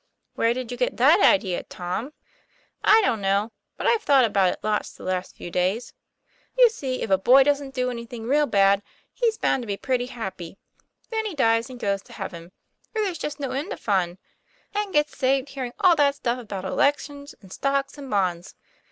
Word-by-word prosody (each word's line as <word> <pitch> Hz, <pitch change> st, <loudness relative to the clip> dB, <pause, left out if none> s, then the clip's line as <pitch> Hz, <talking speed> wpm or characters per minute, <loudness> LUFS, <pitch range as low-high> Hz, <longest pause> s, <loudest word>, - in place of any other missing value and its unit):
" -, -, -52 dB
Where 230 Hz, +1 st, +1 dB
did 255 Hz, -2 st, -5 dB
you 245 Hz, -, -5 dB
get 250 Hz, 0 st, -1 dB
that 295 Hz, +9 st, +6 dB
idea, 215 Hz, -, +3 dB
Tom? 180 Hz, +10 st, -5 dB, 0.4 s
" -, -, -37 dB, 0.3 s
"I 445 Hz, -, +6 dB
don't 225 Hz, -, +1 dB
know, 200 Hz, +3 st, +1 dB, 0.3 s
but -, -, -5 dB
I've 460 Hz, -2 st, +3 dB
thought 275 Hz, -, +5 dB
about 195 Hz, -4 st, +2 dB
it -, -, -7 dB
lots 215 Hz, -1 st, -1 dB
the -, -, -14 dB
last 185 Hz, 0 st, -3 dB
few 175 Hz, -, -8 dB
days. 185 Hz, +7 st, -1 dB, 0.6 s
You -, -, +7 dB
see, 265 Hz, -, -4 dB
if 200 Hz, -, -4 dB
a 190 Hz, -, +4 dB
boy 260 Hz, +7 st, +6 dB
doesn't 280 Hz, -1 st, -1 dB
do 250 Hz, -1 st, 0 dB
any 235 Hz, -1 st, -7 dB
thing 230 Hz, -1 st, -8 dB
real 290 Hz, +5 st, +2 dB
bad, 200 Hz, -2 st, +4 dB, 0.3 s
he's 460 Hz, -3 st, 0 dB
bound 265 Hz, -, +1 dB
to 235 Hz, -, -8 dB
be 200 Hz, -1 st, -2 dB
pretty 250 Hz, 0 st, -1 dB
happy; 195 Hz, -8 st, -7 dB, 0.5 s
then 445 Hz, -1 st, -1 dB
he 385 Hz, -, -6 dB
dies 230 Hz, -2 st, +2 dB
and 250 Hz, -1 st, -10 dB
goes 200 Hz, -2 st, -1 dB
to -, -, -16 dB
heaven, 170 Hz, -1 st, -7 dB, 0.4 s
where 435 Hz, -1 st, 0 dB
there's 365 Hz, -6 st, -3 dB
just 295 Hz, -1 st, -5 dB
no 275 Hz, -2 st, -3 dB
end 295 Hz, -, -3 dB
of -, -, -9 dB
fun, 185 Hz, -4 st, 0 dB, 0.6 s
and 415 Hz, -1 st, -2 dB
gets 295 Hz, -2 st, +1 dB
saved 270 Hz, 0 st, +1 dB
hearing 260 Hz, -3 st, -5 dB
all 360 Hz, -2 st, +5 dB
that 285 Hz, -2 st, +3 dB
stuff 245 Hz, -2 st, -2 dB
about 200 Hz, -5 st, -6 dB
elections 285 Hz, +6 st, -1 dB
and 190 Hz, -3 st, -13 dB
stocks 275 Hz, 0 st, -1 dB
and 280 Hz, -2 st, -9 dB
bonds." 185 Hz, -4 st, -1 dB
250 Hz, 210 wpm, -24 LUFS, 200-285 Hz, 0.6 s, You